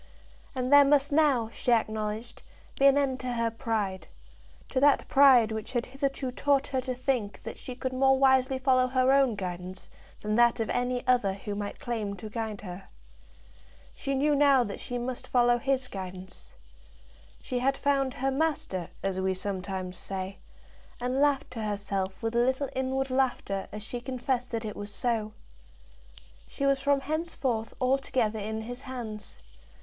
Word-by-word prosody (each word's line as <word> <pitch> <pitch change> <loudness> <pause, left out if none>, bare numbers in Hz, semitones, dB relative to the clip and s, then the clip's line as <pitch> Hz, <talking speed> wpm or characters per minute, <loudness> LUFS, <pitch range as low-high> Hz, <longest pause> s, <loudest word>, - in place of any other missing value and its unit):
And 255 +1 0
there 285 0 +10
must 280 0 +3
now, 285 -7 +3
she 245 - -2
acknowledged, 220 0 -1 0.4
be 275 - +7
an 275 0 +5
end 270 -2 +1
to 255 -1 -3
her 230 -1 0
pride, 220 -5 -2 0.6
to 260 - 0
that 285 +1 +4
pride 260 -5 +6
which 220 +3 -4
had 240 -1 0
hitherto 270 0 -3
taught 280 +2 +2
her 265 -2 -1
to 255 0 -3
think 245 -5 -2
that - - -6
she 255 - -8
could 260 0 -3
more 265 +1 +4
wisely 265 -1 +4
follow 255 -1 +3
her 255 0 +3
own 270 -4 +4
guidance 185 -1 -6 0.3
than 210 0 -2
that 235 +1 +4
of 225 - -1
any 245 0 -1
other 240 -7 +2
who 205 +1 -6
might 205 0 -5
claim 225 -7 -3
to 210 +2 -9
guide 220 -2 -4
her. 185 -1 -8 1.1
She 275 0 -3
knew 295 +3 +2
now 280 -3 +5
that 205 -3 -6
she 245 - -4
must 245 +1 -4
follow 240 -1 +3
his 265 0 0
guidance. 185 -3 -9 0.9
She 250 - -2
had 270 +2 +1
found 275 -2 +1
her 270 +1 0
master, 270 - -1
as 195 -1 -1
we 190 0 0
sometimes 185 -1 -4
say, 195 0 -5 0.6
and 250 +3 0
laughed 285 -2 +2
to 230 -3 -5
herself 200 -2 -3
with 225 +1 -1
a - - +4
little 260 +2 0
inward 265 0 -1
laughter 250 -7 0
as 210 0 -7
she 240 +2 -6
confessed 250 0 -2
that 230 -1 -3
it 210 - -5
was 205 0 -6
so. 215 0 -1 1.1
She 275 - -3
was 275 -1 +2
from 280 0 +2
henceforth 275 -7 -2
altogether 255 -4 +1
in 220 +2 -3
his 245 +2 -7
hands. 230 -6 -6
245 Hz, 170 wpm, -28 LUFS, 210-270 Hz, 1.1 s, there